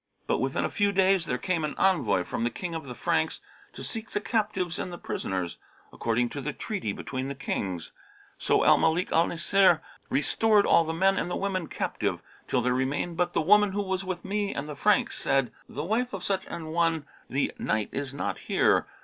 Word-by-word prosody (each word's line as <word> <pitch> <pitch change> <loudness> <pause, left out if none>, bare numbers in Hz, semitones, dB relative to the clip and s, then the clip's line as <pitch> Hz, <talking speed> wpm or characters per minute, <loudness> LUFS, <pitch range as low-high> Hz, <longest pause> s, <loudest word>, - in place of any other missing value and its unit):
But - - +1
within - - 0
a - - -1
few 205 -1 +2
days 190 -3 +3
there 125 - 0
came 175 -1 -1
an 150 - -2
envoy 180 - +3
from 115 - -3
the 120 - +2
King 175 +6 -5
of 160 -3 -5
the 125 - -6
Franks, - - 0 0.3
to - - -8
seek 220 -1 -4
the - - -1
captives 205 -5 -1
and 180 - -3
the 175 - -6
prisoners, 95 - -3 0.3
according 120 +1 0
to 140 - -5
the 150 +2 -3
treaty 195 - -3
between 130 +5 -4
the 140 - -4
Kings. 95 -10 -3 0.5
So - - +3
Al - - +6
Malik 160 +3 +2
al 165 +1 +4
Nasir 175 0 +4 0.3
restored 210 +7 +3
all 165 - +5
the 160 - -2
men 190 +4 +3
and - - -2
women 190 -4 -1
captive, - - -2 0.2
till 125 - +1
there 125 0 +2
remained 135 +6 -1
but 175 +1 0
the - - +2
woman 210 +3 +5
who 205 - 0
was 190 -1 -2
with 185 -1 -5
me 200 +1 -1
and 140 - -3
the 150 - -6
Franks 210 - +2
said, 135 -2 +1 0.2
'The 145 - -4
wife 230 +7 0
of 190 -2 -5
such 195 0 -1
an 165 -2 -6
one 165 -2 +1 0.2
the 140 +2 0
Knight 105 0 0
is 140 -1 -3
not 100 -9 -3
here.' - - +2
170 Hz, 210 wpm, -27 LUFS, 140-195 Hz, 0.5 s, Al